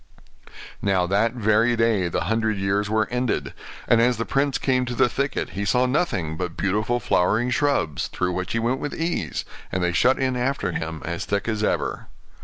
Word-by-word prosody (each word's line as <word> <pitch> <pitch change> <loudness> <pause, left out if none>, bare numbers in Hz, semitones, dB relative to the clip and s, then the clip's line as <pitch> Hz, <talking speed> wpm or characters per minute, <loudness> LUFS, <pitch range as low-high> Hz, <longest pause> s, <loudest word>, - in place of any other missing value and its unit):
Now 95 -3 +2
that 105 +5 +1
very 115 0 +2
day 115 -5 +2
the 85 - -2
hundred 110 0 0
years 100 +2 0
were 110 0 +1
ended; 125 -1 -1 0.3
and 115 - +5
as 120 0 +3
the 115 - -2
prince 140 -1 +1
came 130 -1 +1
to 120 0 -4
the - - +4
thicket 140 +3 -2
he 100 - -3
saw 125 +5 +2
nothing 100 - -1
but 90 -2 -4
beautiful 105 +5 0
flowering 110 +5 +1
shrubs, 125 - 0
through 90 0 -2
which 90 0 -3
he - - 0
went 120 +3 0
with 145 - -4
ease, 165 - -2 0.3
and 90 -1 -1
they 90 0 +1
shut 125 +8 +4
in 130 -1 0
after 125 -6 -1
him 80 -1 -4
as 85 +1 -3
thick 100 +1 -1
as 110 -2 -1
ever. - - -1
110 Hz, 195 wpm, -23 LUFS, 95-125 Hz, 0.3 s, and